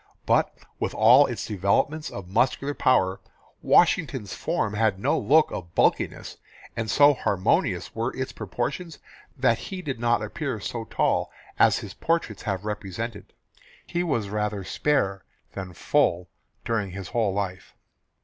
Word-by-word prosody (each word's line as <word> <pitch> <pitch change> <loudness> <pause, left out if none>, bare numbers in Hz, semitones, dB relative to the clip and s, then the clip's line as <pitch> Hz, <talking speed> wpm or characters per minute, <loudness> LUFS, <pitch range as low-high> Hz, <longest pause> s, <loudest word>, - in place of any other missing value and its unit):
But - - +3 0.3
with - - -2
all 125 +6 +7
its 120 -5 -4
development 105 - 0
of 95 -3 -8
muscular 130 +8 +1
power, 95 -10 +2 0.4
Washington's - - +2
form 105 - -1
had 105 -2 +1
no 95 - +1
look 150 +9 +4
of 85 -2 -7
bulkiness, - - 0 0.4
and 115 -1 -3
so 145 +7 +6
harmonious 100 -7 0
were - - -2
its - - -3
proportions 170 -4 -4 0.4
that 125 -3 +2
he 185 -2 -7
did 135 -7 -4
not 120 -2 +1
appear 105 - -4
so - - -5
tall - - 0 0.3
as - - +5
his - - -7
portraits 165 - -1
have 100 -1 -3
represented. 105 +1 -5 0.5
He 175 - -2
was 120 - -1
rather 105 -1 -2
spare 100 -5 0 0.3
than 95 -1 -6
full 85 +1 +1 0.4
during 110 -4 -1
his 95 -2 -7
whole 115 -4 +1
life. 95 -2 -4
110 Hz, 140 wpm, -25 LUFS, 100-130 Hz, 0.5 s, all